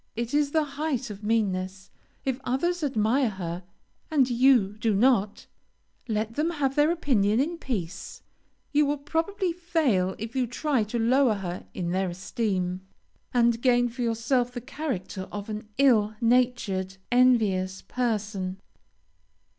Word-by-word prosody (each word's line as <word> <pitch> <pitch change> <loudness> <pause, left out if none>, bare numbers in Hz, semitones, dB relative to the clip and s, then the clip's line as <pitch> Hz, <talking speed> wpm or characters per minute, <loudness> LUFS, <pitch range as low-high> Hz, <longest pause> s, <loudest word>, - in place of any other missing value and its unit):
It 235 +2 -3
is 290 -1 +3
the 315 +1 +2
height 280 -5 -3
of 205 +1 -10
meanness. 195 -3 -1 0.3
If 265 -1 -1
others 340 +7 0
admire 250 -1 +2
her, 175 -3 -5 0.5
and 285 -5 +3
you 240 -5 +4
do 215 -1 +1
not, 215 -2 +2 0.6
let 220 0 -1
them 300 +6 0
have 285 -5 0
their 295 +1 +4
opinion 240 - +2
in 335 +5 -1
peace; 195 - -5 0.5
you 295 0 +3
will 290 +1 0
probably 335 +6 -1
fail 305 - +1
if 225 +3 -7
you 255 -2 +1
try 255 0 0
to 220 +3 -3
lower 240 0 +3
her 185 -2 -6
in 175 -2 -2
their 190 0 0
esteem, 185 0 -2 0.5
and 235 -1 +2
gain 245 -1 +3
for 245 +2 -7
yourself 240 +2 +1
the 245 - -4
character 215 - -5
of 205 +1 -6
an 210 0 -5
ill 220 -6 +4
natured, 230 -6 +1
envious 215 -7 +3
person. 210 -5 -2
235 Hz, 140 wpm, -26 LUFS, 200-270 Hz, 0.6 s, you